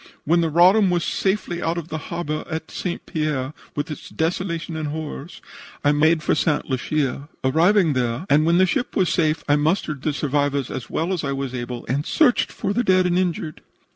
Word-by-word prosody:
"When 170 +3 +3
the 165 - +1
Roddam 185 +5 +5
was 175 -1 +1
safely 190 -3 -1
out 165 +1 -1
of 170 -1 -5
the 155 - -3
harbor 155 -3 -3
of 160 +1 -3
St. 175 -2 -4
Pierre, 150 -3 -2 0.2
with 145 +2 -3
its 150 - -8
desolations 170 0 -2
and 155 - -3
horrors, 155 +1 -6 0.4
I 145 - +5
made 155 +2 +3
for - - +2
St. 150 -1 0
Lucia. 140 +1 -2
Arriving 165 +5 +3
there, 125 +4 -1
and 150 +2 +4
when 170 +2 +3
the 185 - +5
ship 185 +7 -2
was 185 -3 +2
safe, 155 -2 +1
I 145 +1 +4
mustered 150 -2 0
the 155 - 0
survivors 145 -1 -1
as 120 - -6
well 170 +4 -1
as 175 - -2
I 140 -1 -1
was 135 -1 -4
able 120 -1 -5
and 140 +4 -1
searched 270 - +2
for 195 - -2
the 240 +4 +1
dead 185 -3 +4
and 180 0 +2
injured. 170 -4 -2
155 Hz, 200 wpm, -22 LUFS, 145-175 Hz, 0.4 s, Roddam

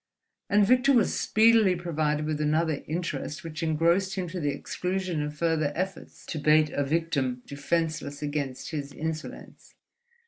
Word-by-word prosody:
And 205 0 +5
Victor 255 +5 +4
was 235 -5 +3
speedily 220 -3 +4
provided 155 -3 -1
with 155 -1 -2
another 155 0 +1
interest 165 -2 -3
which 160 -1 -6
engrossed 170 +4 +2
him 185 -2 -2
to 180 +2 -5
the 145 -3 0
exclusion 180 +3 -2
of 150 0 -4
further 160 -2 +1
efforts 185 0 -5
to 160 - -4
bait 155 +1 +4
a 145 - 0
victim 140 -5 -1
defenseless 150 0 -2
against 145 -3 -3
his 145 -3 -4
insolence. 160 0 -7
160 Hz, 145 wpm, -27 LUFS, 150-180 Hz, -, And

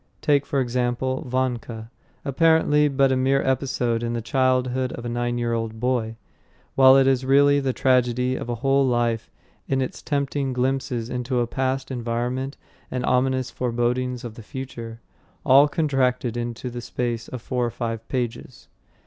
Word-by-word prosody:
Take, 145 -1 +2
for 140 - 0
example, 125 +1 -1
Vanka, 120 -3 -2 0.3
apparently 150 0 +3
but 135 -1 +2
a - - +3
mere 135 +1 +2
episode 125 -3 0
in 120 0 -2
the 120 - -1
childhood 130 0 +1
of 120 - -7
a - - -2
nine 120 0 -1
year 120 -1 -1
old 115 -1 -3
boy; 120 -2 -1 0.6
while 135 0 +7
it 135 - +5
is 135 -1 +2
really 145 +2 +4
the 135 -2 0
tragedy 125 0 +2
of - - -5
a 120 - -1
whole 135 0 +4
life 120 -3 0 0.4
in 135 - 0
its 130 - -3
tempting 140 -2 -1
glimpses 125 -2 -1
into 125 0 -2
a 120 - +2
past 130 +2 -2
environment 125 +3 -3 0.3
and 125 -1 -2
ominous 130 0 +1
forebodings 125 +1 -1
of 120 -3 -6
the 115 - -11
future 115 -1 -8 0.4
all 140 +3 +7
contracted 130 -6 0
into 120 +1 -4
the 120 0 -6
space 120 -1 -3
of 130 - -6
four 125 -2 -1
or 120 - +1
five 115 -1 -5
pages. 125 -1 -4
125 Hz, 165 wpm, -23 LUFS, 120-135 Hz, 0.6 s, while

